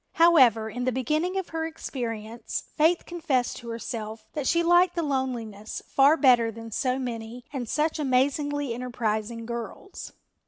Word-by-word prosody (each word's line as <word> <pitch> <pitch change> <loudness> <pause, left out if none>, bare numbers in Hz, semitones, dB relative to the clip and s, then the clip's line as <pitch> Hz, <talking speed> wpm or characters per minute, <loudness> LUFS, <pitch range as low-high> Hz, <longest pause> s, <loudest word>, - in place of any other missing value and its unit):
However, 260 -10 +5
in 245 +3 -4
the 255 - +2
beginning 305 +9 0
of 380 - -3
her 325 0 -3
experience 230 -7 -5
Faith 325 +3 +3
confessed 310 -8 -1
to 235 - -9
herself 225 -1 -5
that 290 -3 -2
she 340 0 +3
liked 350 +1 +4
the 340 - 0
loneliness 240 -7 -3
far 280 +4 +4
better 245 -6 +5
than 225 +1 -9
so 255 +3 0
many 240 -1 -5
and 245 -5 -4
such 310 +1 0
amazingly 285 0 +1
enterprising 230 -2 -3
girls. 235 - -7
255 Hz, 150 wpm, -26 LUFS, 230-305 Hz, -, However